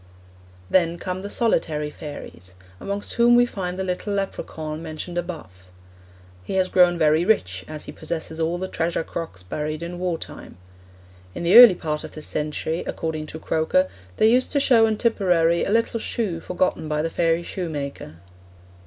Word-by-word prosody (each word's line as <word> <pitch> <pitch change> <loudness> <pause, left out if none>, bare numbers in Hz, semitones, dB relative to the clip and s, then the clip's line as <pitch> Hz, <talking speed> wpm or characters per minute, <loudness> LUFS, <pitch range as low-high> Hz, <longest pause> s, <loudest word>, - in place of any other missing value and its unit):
Then 170 - +2
come 185 +1 -4
The 200 - -6
Solitary 160 -10 0
Fairies, 90 - -9 0.2
amongst 200 +1 -4
whom 240 0 +5
we 245 0 +6
find 185 -6 -4
the 190 - -2
little 185 +3 -3
Lepracaun 160 -5 -4
mentioned 165 +2 -6
above. 155 - -6 0.8
He - - -5
has 185 -1 +2
grown 180 -1 +4
very 155 0 +3
rich, 90 - +1
as 155 +4 -6
he - - -7
possesses 160 0 -5
all 165 +2 0
the 185 +1 -3
treasure 165 -2 -1
crocks 160 - -6
buried 150 - -4
in 175 +1 -6
war 180 -2 -1
time. - - -10 0.8
In - - -4
the 175 +4 +3
early 235 -5 +11
part 155 -3 -3
of - - -9
this 155 - -8
century, 155 +2 -2
according 155 -1 -3
to 160 - -8
Croker, 160 +4 +1 0.3
they - - +4
used 250 +3 +3
to 285 - +3
show 235 -5 +5
in 215 -1 0
Tipperary 175 -8 +2
a - - -2
little 230 +2 +1
shoe 210 -7 -2
forgotten 180 -2 -1
by 150 0 0
the 165 - -2
fairy 165 0 +1
shoemaker. 150 - -5
170 Hz, 170 wpm, -23 LUFS, 155-190 Hz, 0.8 s, early